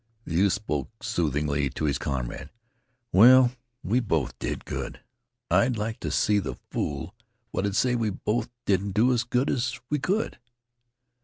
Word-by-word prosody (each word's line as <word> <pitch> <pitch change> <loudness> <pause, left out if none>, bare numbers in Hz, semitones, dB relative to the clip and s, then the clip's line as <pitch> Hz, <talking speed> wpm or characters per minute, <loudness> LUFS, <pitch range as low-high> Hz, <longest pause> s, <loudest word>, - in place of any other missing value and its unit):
The - - -5
youth 95 +3 +3
spoke 75 -9 -4
soothingly 75 -3 0
to 75 +4 -3
his 70 - 0
comrade. 65 +1 -4 0.6
"Well, 125 +5 +8 0.3
we 110 +7 +2
both 80 - -1
did - - -4
good. - - -5 0.5
I'd 105 +7 +3
like 110 +2 -3
to - - -3
see 105 -1 +2
the - - -4
fool 70 +5 -3 0.4
what'd 100 0 -1
say 125 +2 +3
we 115 -3 +1
both 110 +4 -2 0.2
didn't 100 0 +1
do 120 +5 +4
as 120 -1 +1
good 125 +4 0
as 130 +1 -1
we 150 - +1
could!" 195 +11 -1
105 Hz, 155 wpm, -26 LUFS, 80-120 Hz, 0.6 s, Well